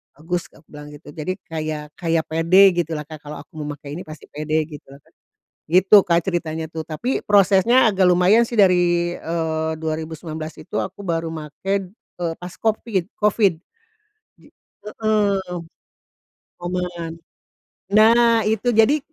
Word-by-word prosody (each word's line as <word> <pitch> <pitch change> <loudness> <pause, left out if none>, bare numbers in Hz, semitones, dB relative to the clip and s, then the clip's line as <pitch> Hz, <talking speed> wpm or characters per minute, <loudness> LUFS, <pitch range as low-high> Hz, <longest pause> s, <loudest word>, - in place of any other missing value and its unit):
"Bagus" 170 +3 -4
aku 150 - -19
bilang 150 0 -10
gitu. 145 0 -13
Jadi 155 +5 -4
kayak 155 -2 -5
kayak 165 -2 +1
pede 185 +5 +6
gitu 170 -2 -2
lah, 150 - -4
Kak, 155 +1 -11
kalau 150 0 -9
aku - - -47
memakai 145 -1 -7
ini - - -7
pasti 155 -1 -10
pede 155 +1 -1
gitu 150 -3 -12
lah 135 - -13
Kak. - - -28 0.5
Gitu, 185 +5 +5
Kak, 170 0 +3
ceritanya 160 -3 -2
tuh, 160 -1 -6
tapi 235 +12 -3
prosesnya 205 +4 +4
agak 195 -3 +2
lumayan 180 +6 +5
sih 235 - -11
dari, 175 -2 +3
eee, 160 -1 -2
2019 160 0 -5
itu 210 - -7
aku - - -3
baru 165 -4 -2
make, 150 -2 -8 0.3
eee, 175 -4 -7
pas 180 0 -9
Covid 215 -4 -1
Covid. 210 -4 +2 0.8
Ji - - -19 0.3
heeh, 205 -4 -1 1.0
momen. 175 -2 -4 0.8
Nah, 230 +2 +5
itu, 220 +3 +1
jadi 225 +7 +4
175 Hz, 145 wpm, -21 LUFS, 160-195 Hz, 1.0 s, pede